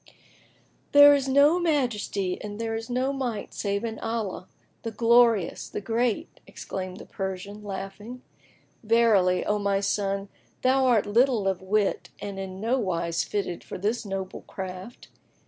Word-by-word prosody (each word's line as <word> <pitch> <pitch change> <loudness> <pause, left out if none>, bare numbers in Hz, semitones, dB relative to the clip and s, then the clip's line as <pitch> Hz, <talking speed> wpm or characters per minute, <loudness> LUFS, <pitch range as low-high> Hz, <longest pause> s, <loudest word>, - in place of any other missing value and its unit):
"There 290 0 +10
is 275 -1 +1
no 285 +6 +5
Majesty 240 - -1
and 205 0 -7
there 225 0 -2
is 225 +1 -5
no 255 +3 0
Might 245 -6 -4
save 200 +1 -2
in 225 -1 -4
Allah, 225 -5 -3 0.3
the 230 - -4
Glorious, 230 -4 +3
the - - -4
Great!" 225 +2 -1
exclaimed 185 -1 -6
the - - -10
Persian, 195 +1 -6
laughing; 205 +5 -7 0.6
"Verily, 215 -5 +3
O 210 0 +1
my 200 -1 +1
son, 200 0 -1 0.4
thou 260 +1 +3
art 235 -5 +3
little 230 0 +2
of 190 -1 0
wit 200 +2 0
and 200 -1 -6
in 190 -1 -6
nowise 185 -8 0
fitted 195 -4 -3
for - - -7
this 210 +5 -1
noble 195 -2 -5
craft. 190 +4 -8
210 Hz, 145 wpm, -26 LUFS, 195-240 Hz, 0.6 s, There